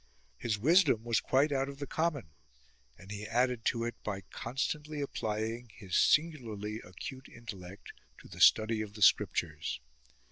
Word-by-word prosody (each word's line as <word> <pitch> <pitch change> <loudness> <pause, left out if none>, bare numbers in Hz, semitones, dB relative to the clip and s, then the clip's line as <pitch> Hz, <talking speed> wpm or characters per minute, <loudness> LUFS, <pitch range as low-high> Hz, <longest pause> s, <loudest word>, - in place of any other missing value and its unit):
His 110 -3 -1
wisdom 145 - +4
was 115 -1 +2
quite 140 +3 +2
out 135 0 0
of 140 - -8
the 140 - -4
common, 150 - -1 0.7
and 95 +2 -12
he 105 0 -5
added 125 +1 +1
to 115 -1 +1
it 120 0 -2
by 100 -2 -3
constantly 150 +5 -3
applying 115 -3 -3
his 95 -5 -5
singularly 115 -10 +2
acute 130 +9 -8
Intellect 100 -5 -10 0.3
to - - -14
the - - -9
study 110 0 +5
of 105 -1 -7
the 105 - 0
scriptures. 75 -9 +2
115 Hz, 150 wpm, -32 LUFS, 105-135 Hz, 0.7 s, study